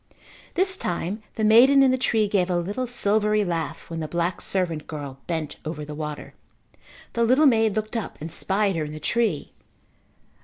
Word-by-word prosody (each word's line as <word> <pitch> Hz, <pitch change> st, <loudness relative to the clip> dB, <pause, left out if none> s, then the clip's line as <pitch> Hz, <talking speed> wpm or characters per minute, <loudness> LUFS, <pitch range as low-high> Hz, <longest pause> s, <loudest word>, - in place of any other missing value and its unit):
This 375 Hz, +1 st, +2 dB
time 180 Hz, -, -3 dB
the 220 Hz, -, -2 dB
maiden 255 Hz, +6 st, +7 dB
in 265 Hz, -, +5 dB
the -, -, +3 dB
tree 220 Hz, -4 st, +2 dB
gave 190 Hz, -3 st, +1 dB
a 180 Hz, -, +1 dB
little 205 Hz, +9 st, -2 dB
silvery 210 Hz, -2 st, +1 dB
laugh 165 Hz, -3 st, -3 dB
when 165 Hz, -1 st, -5 dB
the 155 Hz, -, -3 dB
black 170 Hz, +2 st, -2 dB
servant 170 Hz, -5 st, -2 dB
girl 140 Hz, -3 st, -7 dB
bent 160 Hz, -3 st, -3 dB
over 155 Hz, -1 st, -5 dB
the 150 Hz, -, -7 dB
water. 150 Hz, -1 st, -6 dB, 0.8 s
The 235 Hz, -, +1 dB
little 255 Hz, +6 st, +4 dB
maid 225 Hz, -5 st, +4 dB
looked 215 Hz, +2 st, -3 dB
up 225 Hz, -, -4 dB
and 160 Hz, +2 st, -6 dB
spied 195 Hz, +2 st, +1 dB
her 160 Hz, -, -1 dB
in 150 Hz, -, -7 dB
the 155 Hz, -, -7 dB
tree. 215 Hz, -4 st, -1 dB
195 Hz, 185 wpm, -24 LUFS, 165-225 Hz, 0.8 s, maiden